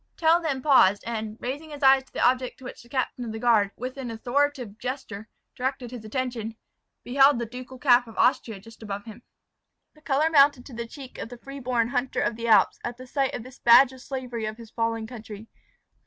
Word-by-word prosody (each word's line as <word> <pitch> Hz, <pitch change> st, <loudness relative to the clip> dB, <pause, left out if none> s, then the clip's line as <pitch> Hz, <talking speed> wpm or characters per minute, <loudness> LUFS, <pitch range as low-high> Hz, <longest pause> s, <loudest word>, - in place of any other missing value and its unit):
Tell 330 Hz, +1 st, +4 dB
then 275 Hz, -6 st, -2 dB
paused, 205 Hz, -9 st, +5 dB
and, 220 Hz, -2 st, -4 dB
raising 285 Hz, +6 st, -5 dB
his 290 Hz, -1 st, -8 dB
eyes 265 Hz, 0 st, +6 dB
to -, -, -26 dB
the -, -, +2 dB
object 255 Hz, 0 st, 0 dB
to -, -, -16 dB
which 255 Hz, -, -9 dB
the 240 Hz, -, -19 dB
captain 255 Hz, -1 st, -2 dB
of 230 Hz, -, -5 dB
the 220 Hz, -, -5 dB
guard, 220 Hz, -4 st, +3 dB
with 255 Hz, +3 st, -6 dB
an 260 Hz, -3 st, -5 dB
authoritative 245 Hz, -1 st, -1 dB
gesture, 235 Hz, -4 st, -6 dB, 0.3 s
directed 255 Hz, -1 st, -3 dB
his 245 Hz, -3 st, -8 dB
attention, 230 Hz, -1 st, -4 dB, 0.5 s
beheld 270 Hz, +2 st, +4 dB
the 235 Hz, -, -2 dB
ducal 250 Hz, +2 st, -9 dB
cap 245 Hz, -2 st, +4 dB
of 225 Hz, -, -13 dB
Austria 225 Hz, -4 st, +1 dB
just 225 Hz, +3 st, -16 dB
above 205 Hz, -2 st, -6 dB
him. 220 Hz, +1 st, -11 dB, 0.7 s
The 305 Hz, -, -22 dB
colour 300 Hz, +2 st, +1 dB
mounted 280 Hz, -4 st, +5 dB
to 270 Hz, -, -12 dB
the 235 Hz, 0 st, -5 dB
cheek 265 Hz, +1 st, -11 dB
of -, -, -6 dB
the 245 Hz, -, -9 dB
free 275 Hz, +3 st, -9 dB
born 240 Hz, -3 st, 0 dB
hunter 255 Hz, 0 st, -1 dB
of 235 Hz, -, 0 dB
the 230 Hz, +1 st, -4 dB
Alps, 220 Hz, -, +4 dB
at 240 Hz, 0 st, -5 dB
the 255 Hz, -, -10 dB
sight 270 Hz, +1 st, -1 dB
of 230 Hz, -, -6 dB
this 255 Hz, +1 st, -14 dB
badge 245 Hz, +3 st, +7 dB
of 260 Hz, -, -13 dB
slavery 250 Hz, -4 st, -5 dB
of 215 Hz, 0 st, -6 dB
his 230 Hz, -1 st, -12 dB
fallen 225 Hz, -1 st, -1 dB
country. 220 Hz, -2 st, -9 dB
245 Hz, 220 wpm, -26 LUFS, 225-265 Hz, 0.7 s, badge